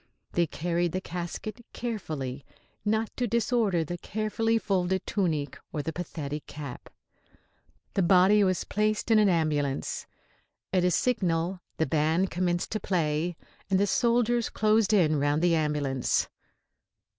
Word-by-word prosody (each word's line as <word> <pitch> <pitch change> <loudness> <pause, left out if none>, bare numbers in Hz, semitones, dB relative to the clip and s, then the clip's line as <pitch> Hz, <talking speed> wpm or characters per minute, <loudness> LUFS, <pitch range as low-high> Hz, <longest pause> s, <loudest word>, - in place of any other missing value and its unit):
They 170 -1 +2
carried 170 +2 -1
the 185 - 0
casket 180 +6 -6
carefully, 155 - -4 0.4
not 220 +1 0
to 245 - 0
disorder 220 -6 +1
the 175 +3 -5
carefully 220 +3 0
folded 190 -3 0
tunic 155 -9 -1
or 150 - -3
the 160 - -3
pathetic 150 -4 -5
cap. 145 -3 -8 1.0
The 195 - +1
body 190 +3 +5
was 185 -2 +1
placed 215 +2 0
in 220 - +6
an 210 -2 +5
ambulance. 150 -5 0 0.7
At 185 -1 +3
a 180 - +4
signal 180 -4 0 0.2
the 160 - +2
band 160 +5 +1
commenced 175 -1 -1
to 215 - -1
play 165 -2 0 0.3
and 190 -1 +3
the 200 - +4
soldiers 235 +2 +2
closed 215 -1 +2
in 160 -8 +4
round 145 +3 +1
the 175 -1 +4
ambulance. 150 -5 +1
180 Hz, 135 wpm, -28 LUFS, 155-210 Hz, 1.0 s, in